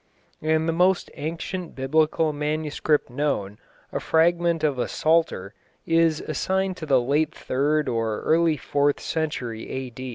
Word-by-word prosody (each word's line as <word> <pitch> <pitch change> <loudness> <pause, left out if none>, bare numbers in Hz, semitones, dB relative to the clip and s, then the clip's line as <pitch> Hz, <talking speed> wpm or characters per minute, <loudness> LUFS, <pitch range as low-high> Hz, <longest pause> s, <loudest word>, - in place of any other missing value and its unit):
and 160 +1 +1
the 165 - +1
most 180 +2 +2
ancient 165 +3 -5
Biblical 155 +3 +1
manuscript 150 0 0
known, 120 -7 -2 0.3
a - - -2
fragment 170 0 +2
of 145 -4 +1
a - - 0
Psalter, 155 - +1 0.3
is 165 -1 +3
assigned 190 +5 -1
to 155 - -7
the 135 -3 +5
late 145 +6 0
third 150 +3 0
or 115 -3 -1
early 165 -1 +3
fourth 145 +1 +1
century 125 -8 -3
A. 130 -2 -5
155 Hz, 135 wpm, -24 LUFS, 135-165 Hz, 0.3 s, the